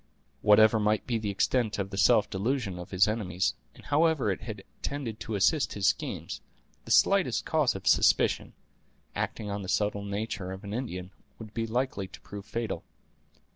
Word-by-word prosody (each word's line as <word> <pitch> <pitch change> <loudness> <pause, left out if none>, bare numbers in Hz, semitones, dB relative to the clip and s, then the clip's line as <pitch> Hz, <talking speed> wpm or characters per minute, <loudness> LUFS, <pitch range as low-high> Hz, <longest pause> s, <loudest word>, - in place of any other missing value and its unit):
Whatever 110 +1 +6
might 105 0 +1
be 120 -2 -1
the 105 -2 -3
extent 110 +3 +1
of 100 -1 -3
the - - -5
self 100 +1 +5
delusion 100 -2 -2
of 90 - -8
his 95 +1 +4
enemies, 100 -4 0 0.2
and - - -16
however 150 -6 +2
it 95 - -4
had 105 -4 -7 0.2
tended 130 -6 -4
to 110 - -4
assist 145 - +2
his 100 -1 -2
schemes, - - -4 0.4
the - - -11
slightest - - +3
cause - - +2
of - - -7
suspicion, - - +3 0.6
acting 105 -2 -3
on 100 0 -3
the 95 - -6
subtle 105 +1 0
nature 100 -2 -4
of 95 +3 -9
an 100 0 -6
Indian, 95 -7 -4 0.3
would 110 -2 -10
be 115 0 -2
likely 120 -4 -1
to 95 - -13
prove 100 -1 -9
fatal. 115 +1 -3
105 Hz, 175 wpm, -29 LUFS, 100-115 Hz, 0.6 s, Whatever